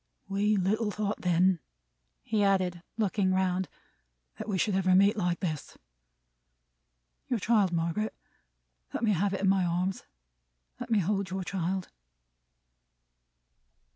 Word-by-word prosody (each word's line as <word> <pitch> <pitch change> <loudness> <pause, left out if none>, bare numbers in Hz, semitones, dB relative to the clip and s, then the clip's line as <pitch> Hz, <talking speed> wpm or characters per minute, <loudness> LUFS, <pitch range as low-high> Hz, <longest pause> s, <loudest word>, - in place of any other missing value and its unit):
We 205 +2 +1
little 210 +4 +1
thought 210 0 -2
then," 180 0 +3 0.6
he 210 -2 +1
added, 185 -3 +1 0.2
looking 195 -3 +1
round, 185 -1 0 0.7
"that - - -5
we 195 - 0
should 205 +2 +1
ever 185 -1 +3
meet 200 +3 +5
like 175 -4 -1
this. 155 -6 -4 1.5
Your 245 - 0
child, 205 -3 +3
Margaret? 170 +6 -1 0.8
Let - - -2
me 220 - +4
have 200 +1 +1
it - - -4
in 195 - +2
my 195 -1 +3
arms. 180 +2 -1 0.7
Let - - -6
me 225 - +3
hold 195 0 0
your 190 0 -3
child." 185 0 -2
190 Hz, 130 wpm, -29 LUFS, 180-205 Hz, 1.5 s, meet